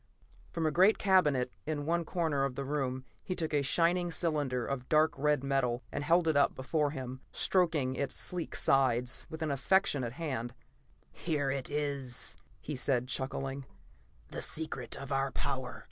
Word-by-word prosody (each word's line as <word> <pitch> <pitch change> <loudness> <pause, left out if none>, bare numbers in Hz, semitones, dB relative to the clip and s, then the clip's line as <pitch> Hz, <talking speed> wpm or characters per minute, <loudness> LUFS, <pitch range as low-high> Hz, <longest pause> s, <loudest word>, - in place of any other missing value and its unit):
From 165 -1 -2
a 155 - +2
great 190 +7 +5
cabinet 150 -11 +3
in 150 -2 -2
one 170 +1 0
corner 160 -5 0
of 135 -2 -1
the 140 - -3
room 130 -2 -2 0.2
he 185 - -4
took 160 -3 -2
a 145 - +3
shining 175 +5 +2
cylinder 145 -8 0
of 130 -2 -4
dark 155 0 +4
red 150 0 +1
metal, 130 -3 0
and - - -3
held 165 +2 +3
it 160 - +3
up 140 -1 +3
before 145 +3 0
him, 130 -2 -6
stroking 160 -8 +1
its 140 0 -2
sleek 180 -2 -2
sides 125 -2 +2
with 160 0 -5
an 155 - -1
affectionate 140 -4 +1
hand. 130 -6 -4 0.6
"Here 145 - -1
it 135 -1 -3
is," 140 -4 -2 0.2
he 150 - -5
said, 125 -1 0
chuckling. 135 0 -3 0.6
"The - - -5
secret 160 -2 0
of 135 0 -8
our 135 0 +1
power. 130 -1 -3
140 Hz, 165 wpm, -32 LUFS, 130-160 Hz, 0.6 s, great